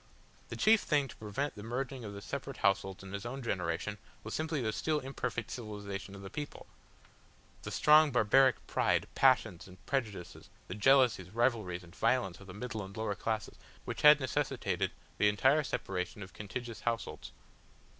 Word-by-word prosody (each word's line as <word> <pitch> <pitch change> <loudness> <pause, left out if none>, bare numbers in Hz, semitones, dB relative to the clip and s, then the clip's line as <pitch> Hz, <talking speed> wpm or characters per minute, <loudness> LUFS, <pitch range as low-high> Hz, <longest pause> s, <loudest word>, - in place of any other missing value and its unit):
The - - -5
chief 220 0 +5
thing 145 -3 +1
to - - -10
prevent 110 +7 -3
the 105 - -10
merging 125 +3 -4
of 105 - -6
the 100 0 -8
separate - - -5
households 95 -1 +1
in 95 0 -9
his 100 0 -4
own 130 +3 -5
generation 95 0 -2 0.2
was 110 - -6
simply 155 -1 -1
the 110 -4 -1
still 155 +4 0
imperfect 125 -4 -4
civilisation 100 -3 -6
of 100 - -10
the 95 - -7
people, 145 -1 -6 1.0
the - - -6
strong 155 0 +6
barbaric 130 +1 +4
pride, - - +1
passions, 85 - +3
and 90 0 -13
prejudices, 110 -10 -3 0.2
the - - -5
jealousies, 120 -3 +4
rivalries, 110 -5 0
and 85 +1 -15
violence 120 -9 +1
of 100 - -13
the 90 - -9
middle 110 -1 -4
and 95 +1 -10
lower 110 -2 -1
classes, 110 +2 -3 0.3
which - - -4
had 150 0 +9
necessitated 130 -2 -1 0.3
the 105 - +5
entire 135 +9 +4
separation 95 -6 -3
of 95 - -12
contiguous 115 +2 -6
households. 115 -1 -3
110 Hz, 170 wpm, -32 LUFS, 100-130 Hz, 1.0 s, had